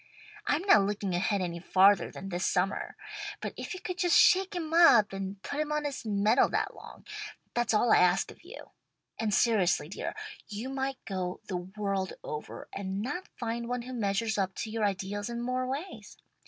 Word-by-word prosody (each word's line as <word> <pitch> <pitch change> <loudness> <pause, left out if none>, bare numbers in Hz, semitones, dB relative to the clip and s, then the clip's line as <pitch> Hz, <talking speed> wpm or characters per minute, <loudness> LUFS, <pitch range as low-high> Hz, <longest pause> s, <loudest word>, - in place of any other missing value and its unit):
I'm 300 +4 +1
not 385 - +6
looking 200 -1 -1
ahead 190 +3 +1
any 170 -1 -3
farther 190 +2 +4
than 195 - -8
this 180 0 -2
summer. 190 +1 0 0.4
But - - -5
if - - -5
you - - -7
could 365 -1 -5
just 355 -4 +4
shake 380 +1 +5
him 325 -2 -3
up 240 - +7
and 195 0 -5
put 285 - -4
him 305 0 -1
on 300 0 0
his 275 -5 -4
mettle 210 +4 +3
that - - -1
long, - - -13 0.5
that's 240 -1 +1
all 220 +2 +4
I - - +7
ask 180 +1 +3
of - - -17
you. 400 +8 -11 0.5
And 220 -1 0
seriously, 190 -8 +3
dear, 195 - -5 0.3
you 220 +4 -5
might 270 0 -2
go 185 -2 -3
the 180 - -3
world 190 +1 -3
over 150 0 -6
and 195 +1 -3
not 325 +10 -4
find 235 -1 -3
one 245 0 -2
who 255 +1 -7
measures 220 -1 0
up 190 -1 -1
to 220 - -4
your 220 -1 0
ideals 200 +2 -2
in 235 0 -4
more 255 +1 -1
ways. 285 +9 -6
215 Hz, 195 wpm, -30 LUFS, 195-260 Hz, 0.5 s, up